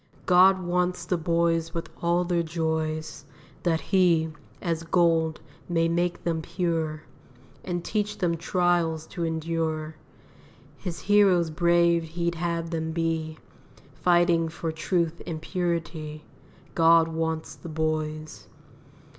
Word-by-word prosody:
God 185 Hz, +1 st, +5 dB
wants 180 Hz, 0 st, 0 dB
the 180 Hz, -, 0 dB
boys 165 Hz, -1 st, 0 dB
with 165 Hz, -, -3 dB
all 170 Hz, +1 st, +2 dB
their 175 Hz, -1 st, +1 dB
joys, 160 Hz, -2 st, -2 dB, 0.4 s
That 165 Hz, -2 st, +1 dB
He, 170 Hz, -5 st, +2 dB, 0.3 s
as 165 Hz, -2 st, -2 dB
gold, 165 Hz, -2 st, +2 dB, 0.3 s
may 165 Hz, -1 st, +2 dB
make 175 Hz, +1 st, -1 dB
them 165 Hz, -2 st, -1 dB
pure, 165 Hz, -2 st, -2 dB, 0.6 s
And 175 Hz, -2 st, -3 dB
teach 210 Hz, -1 st, -1 dB
them 170 Hz, -2 st, +1 dB
trials 170 Hz, -2 st, +1 dB
to 175 Hz, -1 st, -5 dB
endure; 160 Hz, -1 st, -2 dB, 0.8 s
His 175 Hz, +1 st, -6 dB
heroes 190 Hz, -5 st, +4 dB
brave 170 Hz, +1 st, +3 dB
He'd 170 Hz, +1 st, -2 dB
have 170 Hz, 0 st, -2 dB
them 160 Hz, -1 st, -2 dB
be, 160 Hz, -1 st, -1 dB, 0.6 s
Fighting 175 Hz, -2 st, +3 dB
for 165 Hz, 0 st, -4 dB
truth 170 Hz, +1 st, -1 dB
and 160 Hz, -2 st, -3 dB
purity, 160 Hz, -3 st, -3 dB, 0.5 s
God 165 Hz, 0 st, +5 dB
wants 160 Hz, 0 st, -3 dB
the 170 Hz, -, -10 dB
boys. 155 Hz, 0 st, -3 dB
165 Hz, 120 wpm, -26 LUFS, 160-175 Hz, 0.8 s, God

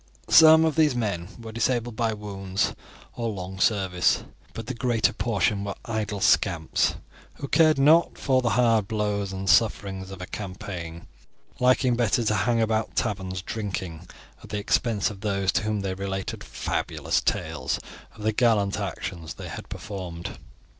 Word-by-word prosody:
Some 160 Hz, 0 st, +8 dB
of 160 Hz, -, 0 dB
these 155 Hz, -5 st, +3 dB
men 100 Hz, -8 st, -2 dB
were 115 Hz, -1 st, -8 dB
disabled 120 Hz, 0 st, -1 dB
by 115 Hz, 0 st, 0 dB
wounds 100 Hz, -2 st, -2 dB, 0.4 s
or 115 Hz, -1 st, -3 dB
long 95 Hz, -2 st, -6 dB
service, 95 Hz, -4 st, +2 dB, 0.3 s
but 115 Hz, -, -6 dB
the 130 Hz, -, -4 dB
greater 120 Hz, -2 st, +1 dB
portion 100 Hz, -3 st, 0 dB
were 100 Hz, -1 st, -4 dB
idle 110 Hz, -3 st, -3 dB
scamps, 85 Hz, -7 st, +2 dB, 0.4 s
who 140 Hz, -, -6 dB
cared 155 Hz, +1 st, +4 dB
not 155 Hz, +5 st, +4 dB
for 130 Hz, -2 st, +2 dB
the 120 Hz, -, +1 dB
hard 115 Hz, -2 st, +3 dB
blows 105 Hz, -2 st, -1 dB
and 95 Hz, 0 st, -5 dB
sufferings 95 Hz, -1 st, +2 dB
of 95 Hz, -1 st, -9 dB
a 90 Hz, -, -5 dB
campaign, 90 Hz, -4 st, -7 dB, 0.5 s
liking 125 Hz, 0 st, +3 dB
better 120 Hz, 0 st, +2 dB
to 110 Hz, -, +1 dB
hang 115 Hz, +2 st, +1 dB
about 110 Hz, 0 st, 0 dB
taverns 95 Hz, -4 st, -2 dB
drinking, 95 Hz, -6 st, -5 dB, 0.4 s
at -, -, -12 dB
the 105 Hz, -, -3 dB
expense 105 Hz, 0 st, +1 dB
of 100 Hz, -2 st, -11 dB
those 100 Hz, -2 st, 0 dB
to -, -, +1 dB
whom 105 Hz, -1 st, -1 dB
they 95 Hz, -1 st, -2 dB
related 95 Hz, 0 st, -4 dB
fabulous -, -, -2 dB
tales -, -, -1 dB, 0.4 s
of 105 Hz, -, -10 dB
the 110 Hz, 0 st, +1 dB
gallant 105 Hz, -4 st, +2 dB
actions 80 Hz, -3 st, -5 dB
they -, -, -8 dB
had -, -, -8 dB
performed. 90 Hz, -4 st, -7 dB
105 Hz, 160 wpm, -25 LUFS, 95-115 Hz, 0.5 s, Some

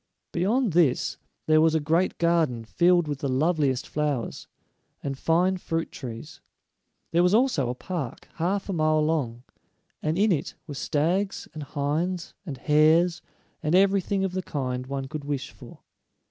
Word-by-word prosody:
Beyond 210 Hz, +4 st, +1 dB
this 160 Hz, -7 st, +2 dB, 0.3 s
there 155 Hz, 0 st, +5 dB
was 160 Hz, 0 st, +4 dB
a -, -, +3 dB
great 165 Hz, +5 st, +1 dB
garden 160 Hz, -9 st, +1 dB
filled 175 Hz, +6 st, +3 dB
with 145 Hz, -2 st, -3 dB
the 140 Hz, -, -2 dB
loveliest 140 Hz, -1 st, +1 dB
flowers, 150 Hz, -6 st, -2 dB, 0.6 s
and 135 Hz, -1 st, -2 dB
fine 175 Hz, +6 st, +2 dB
fruit 165 Hz, -2 st, -3 dB
trees. 125 Hz, +3 st, -8 dB, 0.7 s
There 170 Hz, -, +3 dB
was 180 Hz, +3 st, +4 dB
also 225 Hz, -, +2 dB
a 125 Hz, -, -2 dB
park, 145 Hz, -4 st, -5 dB
half 190 Hz, +4 st, -1 dB
a 195 Hz, -, -2 dB
mile 155 Hz, -2 st, +2 dB
long, 125 Hz, -7 st, -1 dB, 0.6 s
and 155 Hz, +2 st, -1 dB
in 210 Hz, +2 st, +3 dB
it 160 Hz, -, -1 dB
were 150 Hz, -, -7 dB
stags 170 Hz, +8 st, -1 dB
and 155 Hz, -, -6 dB
hinds, 150 Hz, +5 st, -2 dB
and 140 Hz, -4 st, -5 dB
hares, 160 Hz, +4 st, +3 dB, 0.4 s
and 155 Hz, +2 st, +1 dB
everything 195 Hz, 0 st, +3 dB
of 190 Hz, -, 0 dB
the 185 Hz, +1 st, -2 dB
kind 130 Hz, -6 st, -3 dB
one 135 Hz, 0 st, -3 dB
could 150 Hz, +1 st, -6 dB
wish 140 Hz, -2 st, -3 dB
for. -, -, -14 dB
155 Hz, 160 wpm, -26 LUFS, 140-180 Hz, 0.7 s, there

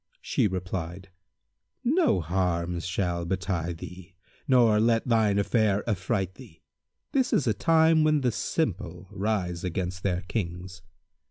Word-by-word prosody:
She -, -, +1 dB
replied, 95 Hz, 0 st, -5 dB, 0.7 s
"No 300 Hz, -, +3 dB
harm 85 Hz, 0 st, -1 dB
shall 90 Hz, -1 st, -2 dB
betide 90 Hz, -2 st, -2 dB
thee, 90 Hz, +2 st, -10 dB, 0.3 s
nor 120 Hz, -5 st, +5 dB
let 115 Hz, +1 st, +2 dB
thine 110 Hz, -4 st, +3 dB
affair 105 Hz, 0 st, +1 dB
affright 95 Hz, -2 st, -1 dB
thee. 105 Hz, -8 st, -15 dB, 0.5 s
This 265 Hz, -2 st, +1 dB
is 145 Hz, -, +2 dB
a 115 Hz, -, +2 dB
time 160 Hz, -, +4 dB
when 155 Hz, -1 st, +3 dB
the 125 Hz, -2 st, +1 dB
simple -, -, -2 dB
rise 95 Hz, -4 st, -2 dB
against 90 Hz, 0 st, -3 dB
their 90 Hz, -2 st, 0 dB
Kings." 90 Hz, -2 st, -5 dB
95 Hz, 125 wpm, -27 LUFS, 90-115 Hz, 0.7 s, nor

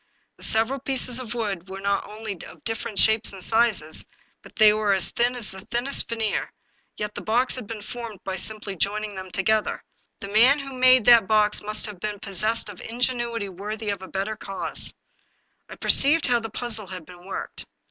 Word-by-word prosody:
The -, -, -13 dB
several 230 Hz, +5 st, +1 dB
pieces 260 Hz, -2 st, +1 dB
of 240 Hz, -2 st, -6 dB
wood 195 Hz, -6 st, -3 dB
were 190 Hz, 0 st, -7 dB
not 200 Hz, +1 st, -1 dB
only 215 Hz, 0 st, -6 dB
of -, -, -15 dB
different 225 Hz, -2 st, -3 dB
shapes 220 Hz, 0 st, +5 dB
and 190 Hz, -2 st, -5 dB
sizes, 220 Hz, -9 st, +2 dB, 0.4 s
but -, -, -16 dB
they 215 Hz, -1 st, +7 dB
were 210 Hz, -1 st, +1 dB
as 185 Hz, -2 st, 0 dB
thin 240 Hz, +2 st, +1 dB
as 235 Hz, -4 st, -6 dB
the 190 Hz, 0 st, -10 dB
thinnest 245 Hz, +4 st, +1 dB
veneer; 225 Hz, -3 st, -2 dB, 0.5 s
yet 210 Hz, 0 st, -3 dB
the -, -, -6 dB
box 240 Hz, +4 st, +1 dB
had 250 Hz, -5 st, -7 dB
been 215 Hz, -1 st, -7 dB
formed 230 Hz, -4 st, -7 dB
by 190 Hz, -1 st, -3 dB
simply 210 Hz, +1 st, -5 dB
joining 210 Hz, +3 st, -2 dB
them 190 Hz, -1 st, -7 dB
together. 210 Hz, +3 st, 0 dB, 0.4 s
The 200 Hz, -, -7 dB
man 235 Hz, +7 st, +6 dB
who 275 Hz, -2 st, -7 dB
made 255 Hz, -2 st, +6 dB
that 235 Hz, -5 st, +7 dB
box 210 Hz, -1 st, +2 dB
must 215 Hz, +1 st, -2 dB
have 210 Hz, -4 st, -8 dB
been 210 Hz, +1 st, -4 dB
possessed 215 Hz, +3 st, -1 dB
of 205 Hz, -3 st, -10 dB
ingenuity 235 Hz, -3 st, -1 dB
worthy 210 Hz, +3 st, -5 dB
of 200 Hz, -2 st, -5 dB
a 190 Hz, -, -8 dB
better 195 Hz, +3 st, -3 dB
cause. 195 Hz, -2 st, -3 dB, 0.8 s
I -, -, -8 dB
perceived 300 Hz, +3 st, +5 dB
how 245 Hz, -1 st, +3 dB
the 225 Hz, -1 st, -6 dB
puzzle 220 Hz, -2 st, -3 dB
had 180 Hz, -3 st, -8 dB
been 180 Hz, +2 st, -14 dB
worked. -, -, -6 dB
215 Hz, 195 wpm, -24 LUFS, 200-235 Hz, 0.8 s, they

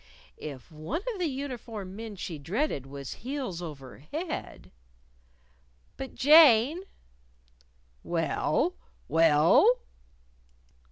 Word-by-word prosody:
If 140 Hz, -3 st, -8 dB
one 160 Hz, -, -4 dB
of 405 Hz, -, -8 dB
the 355 Hz, -, +1 dB
uniformed 235 Hz, -8 st, -6 dB
men 220 Hz, -1 st, -7 dB
she 170 Hz, -4 st, -6 dB
dreaded 170 Hz, -, -2 dB
was 140 Hz, -1 st, -7 dB
heels 255 Hz, -9 st, -4 dB
over 140 Hz, -7 st, -9 dB
head 315 Hz, -, -6 dB, 1.2 s
"But, 270 Hz, -, -7 dB
Jane." 295 Hz, -, +6 dB, 1.2 s
"Well? 170 Hz, -, 0 dB, 0.3 s
Well?" 165 Hz, -, +5 dB
220 Hz, 90 wpm, -28 LUFS, -, 1.2 s, Jane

